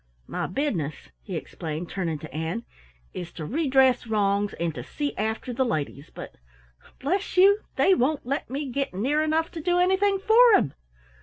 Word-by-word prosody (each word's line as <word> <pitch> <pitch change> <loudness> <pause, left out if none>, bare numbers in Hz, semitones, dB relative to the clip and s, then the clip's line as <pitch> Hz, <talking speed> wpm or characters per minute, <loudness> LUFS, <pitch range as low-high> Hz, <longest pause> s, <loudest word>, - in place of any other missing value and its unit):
My - - -3
business," 175 - -1 0.3
he - - -6
explained, 160 +1 -5
turning 170 -5 -2
to 150 -2 -10
Ann, 160 +9 -3 0.5
"is 175 -1 -6
to 160 - -6
redress 265 - +3
wrongs 205 -1 +1
and 170 -1 -2
to - - -6
see 290 -1 -4
after 220 +3 -2
the 260 +2 +1
ladies, 155 - -3
but - - -10 0.6
bless 370 +7 -2
you 400 +3 +7 0.2
they 385 - +4
won't 285 -2 +1
let 280 +4 -2
me 280 +3 -3
get 275 -5 -2
near 275 +10 +1
enough 315 +1 0
to 330 - -6
do 355 +2 +1
anything 380 +2 +3
for 445 +3 +6
'em!" 140 - +2
260 Hz, 170 wpm, -26 LUFS, -, 0.6 s, you